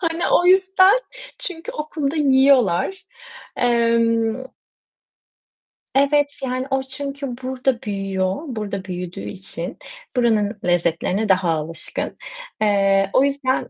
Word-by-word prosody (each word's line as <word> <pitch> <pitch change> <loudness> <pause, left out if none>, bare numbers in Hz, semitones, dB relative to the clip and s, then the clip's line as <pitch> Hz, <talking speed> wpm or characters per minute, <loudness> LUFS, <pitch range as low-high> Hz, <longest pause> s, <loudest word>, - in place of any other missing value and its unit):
Hani 330 -1 -2
o 355 - +4
yüzden, 380 +3 +5 0.4
çünkü 355 -8 -4
okulda 300 -1 -3
yiyorlar. 270 - +3 0.5
Emm 230 0 +1 1.5
Evet 285 +1 +2
yani 255 0 -2
o 270 0 +1
çünkü 275 +1 -5 0.2
burada 260 -1 -1
büyüyor, 195 -4 -2
burada 210 -6 -4
büyüdüğü 180 0 -6
için 185 -2 -5 0.4
buranın 220 -4 +1
lezzetlerine 175 +4 0
daha 185 -2 +3
alışkın. 160 +1 -4 0.4
Eee, 195 -2 +3
o 260 - +5
yüzden 275 -2 0
245 Hz, 100 wpm, -21 LUFS, 195-280 Hz, 1.5 s, yüzden